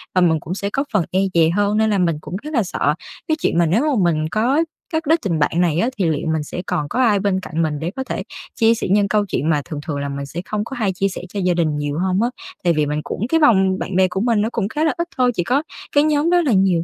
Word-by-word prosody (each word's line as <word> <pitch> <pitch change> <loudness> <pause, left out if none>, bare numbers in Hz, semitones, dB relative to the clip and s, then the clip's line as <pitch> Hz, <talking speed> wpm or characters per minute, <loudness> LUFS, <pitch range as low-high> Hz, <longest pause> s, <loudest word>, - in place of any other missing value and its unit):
và 185 - +4
mình 160 -3 +3
cũng 165 - -5
sẽ 200 +1 -3
có 270 +6 -1
phần 195 -6 +2
e 185 - +2
dè 165 -1 +4
hơn. 205 +4 +1
Nên 220 0 +3
là 205 - +2
mình 170 -4 +1
cũng 175 - -7
rất 305 +1 -7
là 235 -6 +2
sợ 165 -5 0 0.3
cái 315 - +1
chuyện - - 0
mà 170 - +4
nếu 185 - +2
mà 280 -10 +1
mình 155 -1 -1
có 250 +8 +2 0.3
cắt 320 0 0
đứt 325 +2 +3
tình 170 -5 -1
bạn 145 - +2
này 170 -2 +2
á 235 - +2
thì 195 - +1
liệu 155 0 -2
mình 155 -1 -1
sẽ 175 - -5
còn 150 -4 -1
có 250 - -2
ai 220 -6 +4
bên 195 -1 0
cạnh 165 -3 -3
mình 155 -2 -1
để 165 +3 -3
có 265 - -3
thể - - -4 0.3
chia 225 -2 +4
sẻ - - -3
những 200 0 +4
câu 210 0 +1
chuyện 160 -4 -1
mà 150 -2 +2
thường 155 -4 -6
thường 150 -3 -2
là 140 0 -3
mình 140 0 -4
sẽ 165 +5 -6
không 210 +1 -2
có 270 - -7
hay 215 -6 0
chia 195 +2 0
sẻ 190 - -6
cho 200 - -4
gia 180 -2 +2
đình 160 -4 0
nhiều 145 +1 -2
hông 185 +2 +1
á. 240 - +2 0.3
Tại 175 - +3
vì 150 -1 +1
mình 150 +1 -2
cũng 220 - -3
cái 325 - +3
vòng 190 -9 +4
bạn 185 - -4
bè 190 0 +4
của 185 +1 -3
mình 230 -2 +2
nó 220 - 0
cũng 215 -4 -1
khá 300 +6 -1
là 315 - +2
ít 340 0 -2
thôi, 250 -1 +3
chỉ 175 - 0
có 265 - +1 0.3
cái 290 - +4
nhóm 305 +1 +2
đó 355 0 +4
là 295 -6 +1
nhiều 190 -4 +3
190 Hz, 310 wpm, -20 LUFS, 165-235 Hz, 0.3 s, và